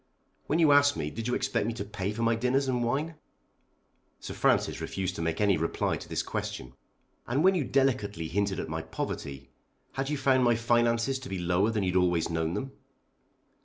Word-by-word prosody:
When 155 - +1
you 160 -3 +5
asked 145 -4 +5
me 75 -1 -3
did 115 +1 -5
you 125 - 0
expect 125 -4 0
me 115 - -1
to 110 -3 -5
pay 100 -1 -3
for 115 +2 -3
my 115 0 +3
dinners 125 +4 +1
and 125 -2 0
wine?" 150 +7 -1 1.0
Sir - - -7
Francis - - +1
refused 95 -1 -3
to - - -3
make 80 0 -1
any 100 -4 +3
reply 80 +1 -1
to - - -11
this - - -1
question. 60 -1 -5 0.5
"And 135 +6 +1
when 190 +1 +6
you 175 -6 0
delicately 115 -11 0
hinted 100 +3 -1
at - - -4
my 80 +1 -3
poverty, 70 -3 -6 0.4
had 135 +1 -3
you 150 - -1
found 130 -1 +3
my 120 -1 +4
finances 120 +2 +1
to 130 - -9
be 95 - -3
lower 90 +4 +1
than 110 -3 -1
you'd 90 -1 -1
always 90 -2 +2
known 80 0 -1
them? 135 0 -4
115 Hz, 200 wpm, -28 LUFS, 90-130 Hz, 1.0 s, when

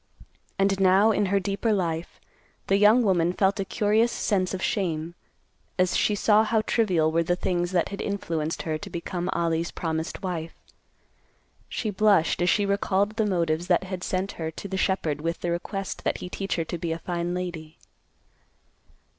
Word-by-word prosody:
And 195 0 +2
now, 195 +3 +5
in 205 -1 +1
her 200 +1 +2
deeper 200 +3 -1
life, 170 -5 -2 0.5
the 195 - +3
young 215 +4 +6
woman 175 -4 +2
felt 195 +2 +1
a - - +1
curious 215 +4 +2
sense 185 -6 0
of 190 - -3
shame, 170 -4 -1 0.6
as 180 -1 +2
she 210 - +2
saw 210 +1 +4
how 220 0 +1
trivial 185 -9 +1
were 165 +1 +2
the 175 +2 +1
things 175 -1 -1
that 175 -2 +1
had 200 - -5
influenced 165 -6 -2
her 155 -1 -2
to - - -8
become 175 +1 -4
Ollie's 170 0 0
promised 160 +3 -4
wife. 165 -3 -4 1.1
She 215 - -2
blushed, 200 -4 +3
as 175 - +3
she 205 - +3
recalled 200 0 +1
the 220 -2 +2
motives 170 -3 0
that 180 0 +3
had 185 -1 -5
sent 185 +2 -1
her 160 - -1
to 160 +5 -8
the 190 - -4
shepherd 175 -6 0
with 165 +2 -3
the 175 - -1
request 195 +3 -4
that - - 0
he 180 - -7
teach 195 +1 -3
her 165 - -1
to 170 - -5
be 170 -1 -2
a 165 - -1
fine 175 0 -3
lady. 170 -3 -5
185 Hz, 180 wpm, -26 LUFS, 170-200 Hz, 1.1 s, young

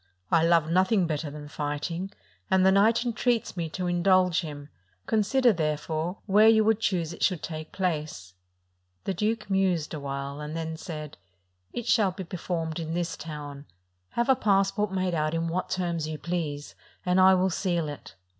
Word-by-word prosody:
I 165 - +5
love 165 -2 +4
nothing 185 +3 +3
better 155 -1 -2
than 145 0 -9
fighting, 150 +5 -3 0.4
and 190 -1 +4
the 190 - +6
knight 220 +5 +4
entreats 235 -2 0
me 170 -3 -3
to 180 +3 -4
indulge 180 0 +3
him: 145 -3 -8 0.4
consider, 230 +3 +3
therefore, 160 +2 -2
where 210 +2 +5
you 220 -1 +6
would 220 0 +3
choose 175 -7 -1
it - - -12
should 180 -5 +1
take 155 -1 -6
place." 155 - -3 0.7
The 195 - -1
duke 215 +4 -1
mused 185 -6 +1
awhile, 140 -1 -4
and 150 +2 -5
then 160 0 -3
said: 155 -3 -7 0.5
"It 240 - -5
shall 215 -5 +3
be 190 +1 -6
performed 165 -2 -4
in 165 0 -3
this 175 -1 -2
town: 145 -2 -8 0.5
have 235 - 0
a 265 - +5
passport 200 -1 +1
made 185 -1 -1
out 155 0 0
in 165 0 -1
what 180 +2 -2
terms 170 -4 -1
you 155 -1 -4
please, 155 -4 -4 0.3
and 180 +1 +3
I 190 0 +7
will 185 +1 +2
seal 170 -3 -1
it." 145 -9 -9
175 Hz, 175 wpm, -27 LUFS, 155-190 Hz, 0.7 s, I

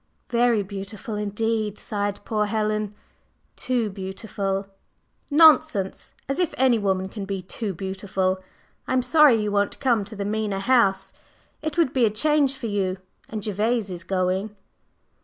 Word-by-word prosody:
"Very 235 -3 +3
beautiful 200 +4 -7
indeed!" 210 0 -1
sighed 205 -1 -3
poor 210 -2 0
Helen. 215 -1 -1 0.6
"Too 245 -3 0
beautiful!" 195 0 -3 0.6
"Nonsense! 300 - +4
As 275 +4 -2
if 355 -4 0
any 255 -3 +4
woman 190 -2 0
can 205 +1 -7
be 195 -1 -4
too 205 +3 -4
beautiful! 190 0 -2 0.5
I - - -1
am 255 -1 +2
sorry 295 0 +6
you 210 -1 -1
won't 205 0 0
come 240 -6 +2
to 215 +2 -9
the 200 -1 -3
Mena 210 -1 -1
House. 195 -4 +2 0.5
It 310 +1 -4
would 325 -6 +3
be 255 -3 +4
a - - +3
change 280 +5 +2
for 260 - -6
you, 195 -3 -1 0.3
and 215 -2 -5
Gervase 215 +1 0
is 175 -1 -6
going." 190 +3 -1
210 Hz, 150 wpm, -24 LUFS, 195-240 Hz, 0.6 s, sorry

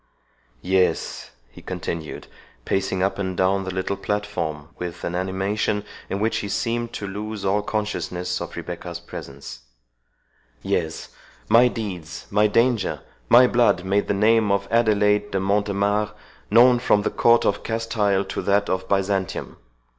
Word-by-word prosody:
—Yes," 95 0 0 0.2
he - - -13
continued, 80 -2 -5 0.4
pacing 95 -1 0
up 100 +1 0
and 95 -2 -3
down 95 +1 +2
the 95 - -3
little 95 +1 -2
platform, 100 -8 -3
with 90 -1 -6
an 85 - -2
animation 95 +3 -1 0.3
in 100 - -2
which 110 +2 +1
he 100 - -3
seemed 120 +2 -1
to 100 - -5
lose 105 +1 -5
all 100 +2 +2
consciousness 105 -4 -3
of - - -6
Rebecca's 85 -1 -6
presence—"Yes, - - -7 0.4
my 115 +3 +7
deeds, 95 -8 -5
my 105 +1 +4
danger, 115 0 +1 0.3
my 125 +2 +8
blood, 120 -6 +2
made 100 +2 +1
the - - +1
name 110 +1 +3
of 100 0 0
Adelaide 105 -3 +3
de 95 - -1
Montemare 100 +1 0 0.4
known 120 +3 +6
from 105 -4 +2
the - - 0
court 115 0 +4
of - - +1
Castile 110 -4 0
to 95 - -4
that 100 +1 +1
of 95 0 -2
Byzantium. 95 -1 -1
100 Hz, 140 wpm, -23 LUFS, 95-105 Hz, 0.4 s, my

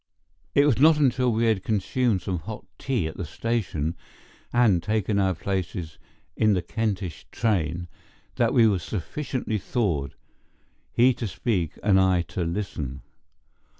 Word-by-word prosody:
It 140 - +6
was 140 -6 +3
not 155 +2 +6
until 130 -3 +3
we 115 +1 +1
had 110 -5 +2
consumed 110 0 0
some 90 -3 -2
hot - - -8
tea 130 - 0
at 80 - -5
the 95 - -3
station 85 -3 -2 0.6
and 115 -8 +4
taken 105 +1 0
our 95 -2 +2
places 90 -3 -4 0.4
in 110 -1 +3
the 90 -2 0
Kentish 100 -4 -3
train 85 -6 0 0.5
that - - +3
we 115 -2 +5
were 100 -4 +2
sufficiently 110 - -3
thawed, 85 - -1 0.8
he 125 +2 +5
to 115 - -4
speak 90 - -2
and 100 -2 +5
I 95 -2 +3
to 90 - -1
listen. 85 -7 -4
100 Hz, 145 wpm, -25 LUFS, 85-115 Hz, 0.8 s, It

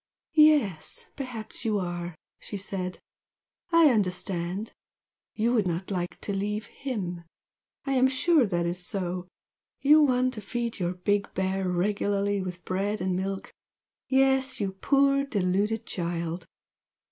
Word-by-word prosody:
"Yes! 300 - +4
perhaps 250 -6 -5
you 215 -2 +1
are!" 175 -2 -3 0.2
she 205 - -6
said 185 -2 -4 0.7
"I 330 -4 +7
understand! 185 -1 -1 0.6
You 230 +2 +2
would 215 -6 +2
not 180 +3 -3
like 175 -2 -3
to 200 - -2
leave 210 +2 -2
HIM! 190 -11 -4 0.6
I 275 - -1
am 260 0 +5
sure 270 0 +3
that 175 -3 0
is 175 +1 -2
so! 180 -1 -3 0.5
You 300 +2 +6
want 255 -3 +3
to 215 - -6
feed 235 +2 -3
your 180 0 -1
big 200 +3 0
bear 190 0 0
regularly 200 +2 +1
with 180 -1 -6
bread 200 +3 -1
and 185 0 0
milk 195 +1 -3 0.5
yes, 265 0 +3
you 200 -2 -1
poor 275 +7 +3
deluded 210 -2 0
child! 170 -1 -3
200 Hz, 135 wpm, -27 LUFS, 180-250 Hz, 0.7 s, I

